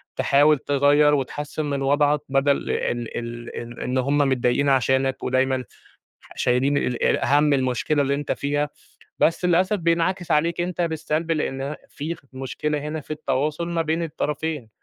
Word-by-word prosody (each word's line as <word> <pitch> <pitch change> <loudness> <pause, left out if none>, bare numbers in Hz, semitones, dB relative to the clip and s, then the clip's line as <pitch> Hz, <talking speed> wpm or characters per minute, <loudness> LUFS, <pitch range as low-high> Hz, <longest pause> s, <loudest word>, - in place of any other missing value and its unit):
تحاول 145 +2 +4
تغيّر 145 +2 +3
وتحسّن 145 +3 -3
من 140 -1 -2
وضعَك 145 +2 +3
بَدَل 135 +1 +3
ال - - -1 0.5
ال 120 0 -6
ال 120 0 -7
إن 125 +1 -1
هم 140 +3 +1
متضايقين 135 0 +2
عشانك 130 0 +1
ودايمًا 130 0 +1 0.6
ح - - -16
شايلين 130 +3 +2
ال 125 -3 -1
ال - - +3
هَم 145 +2 +3
المشكلة 135 +2 +1
اللي 140 0 0
أنت 145 +1 -2
فيها، 145 +1 -1 0.5
بس 165 +2 +2
للأسف 180 +4 +3
بينعكس 170 +1 0
عليك 165 +3 +2
أنت 175 0 -2
بالسلب، 160 -1 -1
لإن 135 -4 -2
ه 145 +3 -4
في 155 +4 -5
خ 165 - -17
مشكلة 135 +3 -3
هنا 155 +1 -4
في 150 - -20
التواصل 150 +2 -1
ما 170 -1 0
بين 160 +1 -1
الطرفين، 150 -4 -3
145 Hz, 160 wpm, -23 LUFS, 135-155 Hz, 0.6 s, تحاول